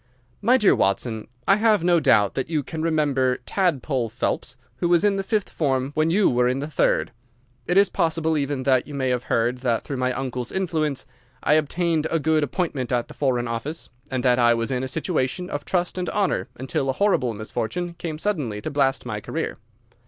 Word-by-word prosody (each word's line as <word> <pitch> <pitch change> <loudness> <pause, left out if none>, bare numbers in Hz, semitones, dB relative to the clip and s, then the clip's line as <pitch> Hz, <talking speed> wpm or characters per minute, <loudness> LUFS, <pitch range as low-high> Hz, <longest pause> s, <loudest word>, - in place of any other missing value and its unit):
My 245 +5 +5
dear 210 -6 +5
Watson,—I 120 - 0
have 215 -4 +3
no 175 -1 +4
doubt 105 -9 +4
that 135 - -3
you 155 -3 0
can 160 +4 -5
remember 145 -6 +1
"Tadpole" 140 - 0
Phelps, - - -3 0.2
who 175 - 0
was 175 -1 +4
in 205 -1 +3
the 195 - 0
fifth 210 0 -1
form 135 -3 0
when 155 +1 +2
you 195 +4 +4
were 125 0 +3
in 125 +1 +1
the 140 - -3
third. 150 -4 +1 0.6
It 175 - +2
is 200 0 +6
possible 160 -3 0
even 140 -2 -1
that 130 -2 +2
you 145 - -7
may 130 -2 0
have 125 -1 -1
heard 120 +2 0
that 120 -3 0
through 140 - -5
my 130 0 0
uncle's 125 -2 -3
influence 160 -7 -1 0.4
I - - +4
obtained 160 +1 +1
a 165 - +1
good 155 0 +2
appointment 145 -4 -2
at 120 -1 0
the - - -9
Foreign 125 -3 0
Office, 125 +8 -4 0.2
and 130 -2 -2
that 125 -1 +3
I 120 -1 +5
was 115 +2 -1
in 125 -1 0
a 130 - -2
situation 160 +3 -1
of 145 0 -4
trust 180 0 -1
and 180 - -2
honour 200 -3 0
until 135 +1 -2
a - - +2
horrible 130 - +1
misfortune 140 +11 -3
came 160 -3 -4
suddenly 150 - -2
to - - -4
blast 135 -4 +1
my 110 -4 -4
career. - - -3
145 Hz, 205 wpm, -23 LUFS, 125-170 Hz, 0.6 s, is